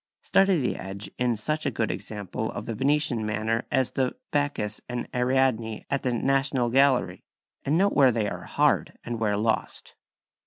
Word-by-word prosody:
Study 195 -3 +3
the 125 - -1
edge 100 +2 -6
in 120 -2 +1
such 155 +8 -2
a - - +3
good 110 - -1
example 105 -3 -5
of - - -6
the 115 - -3
Venetian 135 -1 +1
manner 110 +2 -1
as 130 -2 +1
the 130 -1 -1 0.2
"Bacchus 145 -8 -1
and 125 -1 -3
Ariadne" 125 -3 +1
at 140 - +1
the 125 - 0
National 135 0 +1
Gallery, 125 -9 +3 0.4
and 145 +4 +2
note 200 +2 +3
where 135 -3 +5
they 110 -3 0
are - - -5
hard - - +1
and 120 -1 -4
where 105 -2 +1
lost. 110 +1 -2
125 Hz, 170 wpm, -26 LUFS, 110-135 Hz, 0.4 s, where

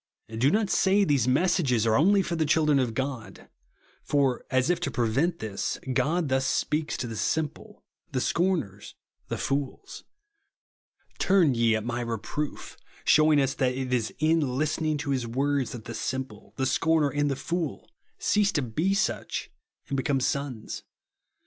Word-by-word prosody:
Do 125 +5 +3
not 210 +3 +1
say 200 +1 +3
these 140 - +2
messages 130 - +2
are 110 -1 +3
only 195 - +4
for 170 - -3
the 160 - +1
children 150 -1 +3
of 120 -4 -1
God; 130 -3 -5 0.5
for, 140 -3 +1
as 130 +5 +2
if 175 - 0
to 175 - -2
prevent 135 +9 0
this, 110 -3 -3 0.2
God 160 +5 +1
thus 130 0 +1
speaks 150 0 -1
to 130 - -3
the 115 -1 -5
"simple," 155 +7 -3 0.3
the 130 - 0
"scorners," 160 - -1 0.3
the - - -3
fools, 135 -1 -3 1.2
"Turn 185 -7 +4
ye 115 -1 +3
at 110 - -2
my 120 0 -2
re 115 -1 -2
proof;" 145 +7 -5 0.3
shewing 155 -1 +5
us 135 -1 +1
that 125 -1 0
it 130 -1 -3
is 115 -3 0
in 160 +2 +3 0.2
listening 155 +1 0
to 145 -1 -3
His 130 -3 0
v/ords 135 +2 0
that 115 -3 -8
the 115 - -6
simple, 130 -4 -5
the 135 - 0
scorner, 155 +2 +2
and 145 0 0
the 135 - 0
fool 165 +2 -3 0.3
cease 205 -1 +2
to 145 - +1
be 160 - 0
such 205 - -2 0.4
and 140 - -3
become 135 0 +1
sons. 135 -4 -3
140 Hz, 165 wpm, -27 LUFS, 125-160 Hz, 1.2 s, shewing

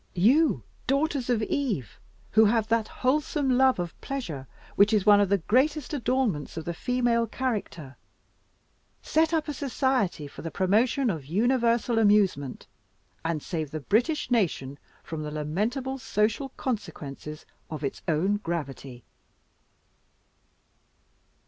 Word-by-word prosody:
You, 235 - +4 0.2
daughters 275 -1 0
of 230 -3 +2
Eve, 210 - -2 0.3
who 220 +1 +6
have 220 0 +2
that 225 -2 +2
wholesome 285 +1 0
love 260 +1 +4
of 175 -2 -5
pleasure 170 - -5 0.3
which 205 +2 +5
is 210 -3 +2
one 205 -1 +7
of 200 - +2
the 200 - +4
greatest 265 - +1
adornments 245 - -1
of 160 - -5
the 170 - -2
female 240 +3 +1
character, 205 - -4 1.1
set 320 +1 +2
up 320 -2 0
a 295 - -2
society 260 - 0
for 140 - -10
the 165 - -4
promotion 225 - +2
of 155 -6 -6
universal 235 - +2
amusement, 200 - +2 0.6
and 165 -2 -2
save 160 -5 -3
the 155 +2 -4
British 245 - 0
nation 150 - 0 0.2
from 160 -1 -5
the 150 - -4
lamentable 215 - -2
social 225 +3 0
consequences 155 - -5 0.2
of 155 -2 -6
its 140 - -3
own 180 +6 +2
gravity!" 140 - -5
215 Hz, 130 wpm, -27 LUFS, 160-255 Hz, 1.1 s, one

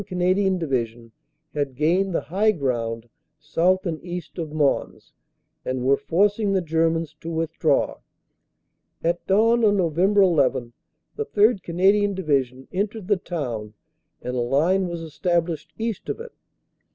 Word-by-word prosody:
Canadian 185 +1 +1
Divi 135 -8 0
sion 115 0 -17 0.4
had 140 -3 -2
gained 175 +7 +2
the - - +1
high 200 +6 +1
ground 120 - -2 0.3
south 175 +5 +1
and 165 -3 -3
east 175 -1 -7
of 160 -3 -4
Mons 150 -3 -1 0.5
and 130 -1 -3
were 135 +1 +5
forcing 200 +8 +1
the 190 - +2
Germans 165 -1 0
to 165 - -7
withdraw. 165 -1 0 1.0
At 170 0 0
dawn 230 +4 +4
on 205 -2 +4
Nov. 170 -5 0
1 190 +4 +3
1 140 -11 +3 0.4
the 440 - -2
3rd. 210 -1 +3
Canadian 195 +4 +2
Division 135 -7 -1
entered 205 +1 -3
the 205 - +4
town 120 - -5 0.5
and 125 - -3
a - - 0
line 160 +10 +2
was 170 -1 -5
established 165 0 -1
east 225 -3 -4
of - - -3
it. 470 0 -8
170 Hz, 145 wpm, -23 LUFS, 140-195 Hz, 1.0 s, were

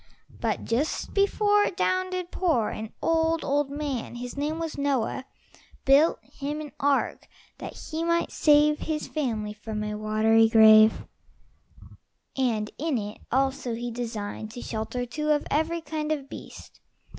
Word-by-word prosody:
But - - -1
just 260 +7 -1
before 410 +1 +3
it 365 - -4
down 370 -1 +1
did 365 -1 -4
pour, 310 - +1
An 220 0 -6
old, 325 0 +2
old 285 0 +1
man 280 -5 -4
his 245 +1 -6
name 295 +3 -2
was 330 -1 -4
Noah 275 -2 -1 0.6
Built 280 +4 +5
him 295 +2 -5
an 300 -1 -7
ark, 285 -1 0 0.3
that - - -7
he 320 +1 -5
might 335 0 +1
save 300 0 +4
His 310 -1 -3
family 225 -8 -2
from 215 0 -5
a 210 0 -3
watery 215 +1 +3
grave; 220 -1 +7 1.3
And 225 -5 0
in 305 -3 0
it 210 -1 -5
also 265 -1 0
he 240 +1 -4
designed 225 -3 -5
To 245 - -7
shelter 225 +3 -3
two 300 +5 -3
of 295 -1 +2
every 325 +3 0
kind 310 0 -3
Of 285 -3 -2
beast. - - -11
280 Hz, 150 wpm, -26 LUFS, 225-310 Hz, 1.3 s, grave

